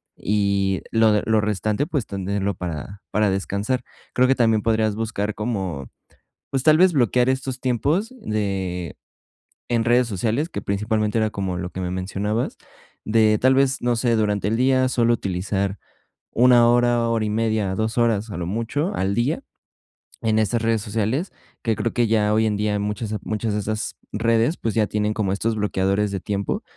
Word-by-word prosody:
y 100 Hz, -2 st, 0 dB
lo 110 Hz, -2 st, +4 dB
lo 110 Hz, -1 st, +3 dB
restante, 105 Hz, +5 st, -1 dB
pues, 145 Hz, -9 st, -2 dB
tenerlo 100 Hz, 0 st, -2 dB
para 90 Hz, +2 st, -6 dB
para 105 Hz, -1 st, +2 dB
descansar. 100 Hz, +6 st, -1 dB, 0.3 s
Creo 130 Hz, +1 st, +4 dB
que 135 Hz, -, +3 dB
también 115 Hz, -3 st, +3 dB
podrías 110 Hz, -2 st, +1 dB
buscar 105 Hz, -2 st, -2 dB
como, 95 Hz, -, -3 dB, 0.6 s
pues 135 Hz, -2 st, -1 dB
tal 155 Hz, +1 st, +6 dB
vez 185 Hz, 0 st, +5 dB
bloquear 125 Hz, -, +2 dB
estos 130 Hz, -1 st, -3 dB
tiempos 150 Hz, -, 0 dB
de 95 Hz, -, -3 dB, 0.7 s
en 115 Hz, -2 st, +1 dB
redes 120 Hz, +1 st, +3 dB
sociales, 115 Hz, -, -1 dB
que -, -, -5 dB
principalmente 105 Hz, +2 st, -1 dB
era 110 Hz, -1 st, +2 dB
como 95 Hz, -3 st, -3 dB
lo 90 Hz, 0 st, -4 dB
que -, -, -7 dB
me 90 Hz, -1 st, -3 dB
mencionabas, 100 Hz, +5 st, -2 dB, 0.5 s
de 110 Hz, -1 st, +3 dB
tal 130 Hz, +1 st, +4 dB
vez, 135 Hz, 0 st, +2 dB
no 120 Hz, 0 st, +1 dB
sé, 115 Hz, 0 st, +1 dB
durante 105 Hz, -2 st, 0 dB
el 115 Hz, -, 0 dB
día 130 Hz, +1 st, +3 dB
solo 120 Hz, -2 st, +2 dB
utilizar 100 Hz, -1 st, -2 dB, 0.6 s
1 120 Hz, -1 st, +6 dB
hora, 120 Hz, -1 st, +3 dB
hora 115 Hz, -2 st, 0 dB
y 105 Hz, -, -1 dB
media, 110 Hz, -3 st, 0 dB
2 110 Hz, +3 st, -2 dB
horas, 115 Hz, -2 st, +1 dB
a 100 Hz, -, -5 dB
lo 85 Hz, -1 st, -3 dB
mucho 115 Hz, -, -2 dB
al 95 Hz, +1 st, 0 dB
día, 130 Hz, +7 st, 0 dB, 0.8 s
en 110 Hz, -1 st, +1 dB
estas 110 Hz, +2 st, +1 dB
redes 115 Hz, -2 st, +1 dB
sociales, 115 Hz, -, -2 dB, 0.3 s
que 115 Hz, -2 st, +1 dB
creo 115 Hz, -, -2 dB
que 120 Hz, -1 st, +2 dB
ya 105 Hz, -1 st, +2 dB
hoy 110 Hz, -, +3 dB
en 105 Hz, -, 0 dB
día 105 Hz, 0 st, 0 dB
muchas, 105 Hz, +1 st, -3 dB
muchas 110 Hz, 0 st, -2 dB
de 105 Hz, -, 0 dB
esas 110 Hz, +2 st, -3 dB, 0.2 s
redes, 115 Hz, +7 st, +2 dB
pues, 115 Hz, -1 st, -2 dB
ya 110 Hz, -2 st, +2 dB
tienen 105 Hz, 0 st, -1 dB
como 100 Hz, -3 st, -1 dB
estos 110 Hz, +3 st, -1 dB
bloqueadores 100 Hz, 0 st, 0 dB
de 95 Hz, -, -3 dB
tiempo. 100 Hz, +1 st, -2 dB
110 Hz, 175 wpm, -22 LUFS, 100-120 Hz, 0.8 s, tal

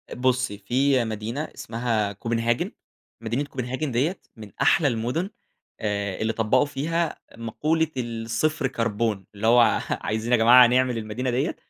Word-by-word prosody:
بُصّي، 125 Hz, -4 st, 0 dB
في 130 Hz, +5 st, +2 dB
مدينة 110 Hz, +5 st, -4 dB
اسمها 115 Hz, -3 st, -2 dB
Copenhagen. 115 Hz, +3 st, -1 dB, 0.5 s
مدينة 115 Hz, +5 st, -1 dB
Copenhagen 130 Hz, +1 st, -4 dB
ديّة، 140 Hz, +9 st, 0 dB, 0.2 s
من 105 Hz, -3 st, -11 dB
أحلى 160 Hz, -6 st, +4 dB
المُدُن 125 Hz, -, -1 dB, 0.5 s
آآ 100 Hz, -3 st, -2 dB
اللي 110 Hz, +1 st, 0 dB
طبّقوا 115 Hz, +5 st, +2 dB
فيها 160 Hz, +4 st, -2 dB, 0.2 s
مقولة 155 Hz, +8 st, 0 dB
الصفر 115 Hz, +4 st, -1 dB
كربون. 115 Hz, -5 st, -1 dB
اللي 105 Hz, +2 st, -1 dB
هو، 120 Hz, 0 st, +5 dB
عايزين 110 Hz, +3 st, -2 dB
يا 120 Hz, -, +6 dB
جماعة 120 Hz, +2 st, +8 dB
نعمل 125 Hz, 0 st, +2 dB
المدينة 115 Hz, +4 st, -3 dB
ديّة، 130 Hz, +6 st, 0 dB
120 Hz, 135 wpm, -24 LUFS, 110-130 Hz, 0.5 s, جماعة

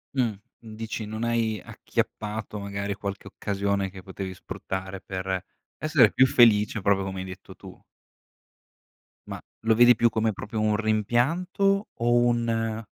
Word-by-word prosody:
Mh, 130 Hz, -, +3 dB, 0.4 s
n 110 Hz, -1 st, -10 dB
dici, 110 Hz, 0 st, -5 dB
non 110 Hz, +2 st, -5 dB
hai 115 Hz, -3 st, 0 dB
acchiappato, 105 Hz, 0 st, -4 dB
magari, 100 Hz, 0 st, -3 dB
qualche 100 Hz, 0 st, -6 dB
occasione 100 Hz, -1 st, -1 dB
che 95 Hz, -1 st, -11 dB
potevi 95 Hz, -1 st, -6 dB
sfruttare 95 Hz, +1 st, -6 dB
per, 95 Hz, -1 st, -3 dB, 0.4 s
essere 155 Hz, -3 st, +4 dB
più 130 Hz, -, +5 dB
felice, 110 Hz, -3 st, +4 dB
proprio 95 Hz, -1 st, +2 dB
come 95 Hz, -1 st, -5 dB
hai -, -, -5 dB
detto 95 Hz, 0 st, -10 dB
tu. -, -, -13 dB, 1.5 s
Ma, -, -, -6 dB, 0.2 s
lo 110 Hz, 0 st, +3 dB
vedi 120 Hz, +1 st, +7 dB
più 120 Hz, +1 st, +3 dB
come 110 Hz, 0 st, 0 dB
proprio 105 Hz, +3 st, -5 dB
un 105 Hz, 0 st, +2 dB
rimpianto, 140 Hz, -, +1 dB
o 120 Hz, +1 st, +1 dB
un: 115 Hz, -2 st, +1 dB
110 Hz, 145 wpm, -26 LUFS, 100-115 Hz, 1.5 s, vedi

